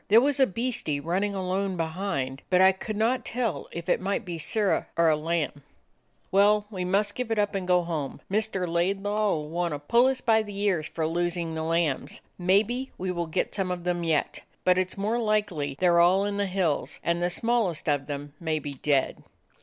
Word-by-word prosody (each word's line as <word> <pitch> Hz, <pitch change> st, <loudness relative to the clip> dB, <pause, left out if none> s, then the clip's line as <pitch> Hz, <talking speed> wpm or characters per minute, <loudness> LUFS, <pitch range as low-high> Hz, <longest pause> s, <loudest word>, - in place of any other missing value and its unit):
There 220 Hz, +3 st, +7 dB
was 280 Hz, +2 st, +1 dB
a 265 Hz, -, +5 dB
beastie 215 Hz, -, -2 dB
runnin' 190 Hz, +6 st, -1 dB
alone 190 Hz, 0 st, -1 dB
behind, 160 Hz, -6 st, -2 dB
but 180 Hz, -, +4 dB
I 190 Hz, 0 st, +7 dB
could 205 Hz, +3 st, -6 dB
not 235 Hz, +4 st, +1 dB
tell 225 Hz, -, -2 dB
if 170 Hz, -1 st, -6 dB
it -, -, +2 dB
might 195 Hz, +2 st, -1 dB
be 170 Hz, -2 st, -5 dB
Sirrah 205 Hz, +5 st, +1 dB
or 165 Hz, -1 st, +5 dB
a 155 Hz, -, +4 dB
lamb." 155 Hz, -2 st, -2 dB, 0.7 s
"Well, 205 Hz, +2 st, +4 dB
we 185 Hz, -3 st, -3 dB
must 200 Hz, +3 st, +1 dB
give 250 Hz, 0 st, -4 dB
it 225 Hz, -, 0 dB
up, 205 Hz, 0 st, +1 dB
and 190 Hz, -2 st, -3 dB
go 180 Hz, -1 st, +4 dB
home. 160 Hz, -5 st, -4 dB
Mr. 200 Hz, -3 st, -1 dB
Laidlaw 200 Hz, +5 st, 0 dB
'll 150 Hz, -1 st, -4 dB
want 170 Hz, -1 st, -1 dB
to -, -, -6 dB
pull 235 Hz, -, +3 dB
us 265 Hz, -1 st, +1 dB
by 225 Hz, -3 st, +3 dB
the 205 Hz, -2 st, -7 dB
ears 190 Hz, -7 st, 0 dB
for 160 Hz, 0 st, -3 dB
losing 170 Hz, 0 st, -1 dB
the 160 Hz, -, -3 dB
lambs. 165 Hz, -3 st, -1 dB, 0.2 s
Maybe 215 Hz, +8 st, +2 dB
we 185 Hz, 0 st, -2 dB
will 170 Hz, -2 st, -2 dB
get 165 Hz, +3 st, -1 dB
some 195 Hz, -3 st, -1 dB
of 180 Hz, -1 st, -3 dB
them 175 Hz, -1 st, -1 dB
yet, 160 Hz, -3 st, 0 dB, 0.2 s
but 185 Hz, 0 st, +4 dB
it 185 Hz, 0 st, 0 dB
's -, -, -8 dB
more 215 Hz, +4 st, 0 dB
like 215 Hz, -2 st, +1 dB
they 145 Hz, -4 st, -3 dB
're 175 Hz, -2 st, +5 dB
all 185 Hz, +3 st, +4 dB
in 205 Hz, 0 st, -2 dB
the 200 Hz, -1 st, 0 dB
hills, 180 Hz, -6 st, -1 dB
and 170 Hz, 0 st, 0 dB
the 175 Hz, -, +1 dB
smallest 220 Hz, -4 st, 0 dB
of 145 Hz, -2 st, 0 dB
them 145 Hz, 0 st, -6 dB
may 160 Hz, -2 st, -1 dB
be 145 Hz, -2 st, -5 dB
dead." 140 Hz, 0 st, 0 dB
185 Hz, 215 wpm, -27 LUFS, 165-205 Hz, 0.7 s, There